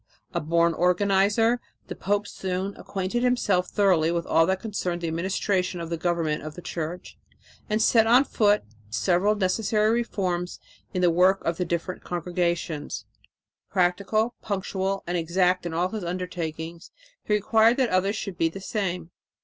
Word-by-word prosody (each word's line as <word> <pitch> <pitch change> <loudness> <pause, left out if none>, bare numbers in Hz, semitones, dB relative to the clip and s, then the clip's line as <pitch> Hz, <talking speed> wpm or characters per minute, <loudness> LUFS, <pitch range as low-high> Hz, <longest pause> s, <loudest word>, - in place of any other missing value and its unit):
A - - 0
born 170 +2 +2
organizer, 200 +7 +2 0.2
the - - -7
pope 205 +1 -1
soon 190 +1 -3
acquainted 195 +5 -3
himself 210 -8 +2
thoroughly 180 -6 +3
with 170 -1 -1
all 165 0 +3
that 190 0 +1
concerned 185 -5 -3
the 170 - -2
administration 185 +2 -1
of 170 0 -6
the - - +1
government 165 -2 -1
of 155 0 -7
the 175 - -8
Church 170 +2 -5 0.5
and 215 +1 +1
set 225 0 +4
on 245 +4 +6
foot 210 -6 +2 0.3
several 180 - +2
necessary 210 +2 +1
reforms 185 -7 -1 0.3
in 180 - -1
the 175 - +5
work 185 +3 +3
of 165 0 0
the 180 - -1
different 170 +2 -3
congregations. 175 -3 -2 0.6
Practical, 200 +5 +1
punctual 195 -1 -2
and 175 +1 -1
exact 180 +2 +1
in 165 - -5
all 175 +2 +1
his 215 -1 -5
undertakings, 170 -1 -5 0.3
he 210 - +1
required 220 +3 +4
that 260 -3 +2
others 190 +3 +1
should 195 -5 -5
be 165 - +3
the 195 - -8
same. 180 -4 -3
185 Hz, 155 wpm, -25 LUFS, 170-205 Hz, 0.6 s, on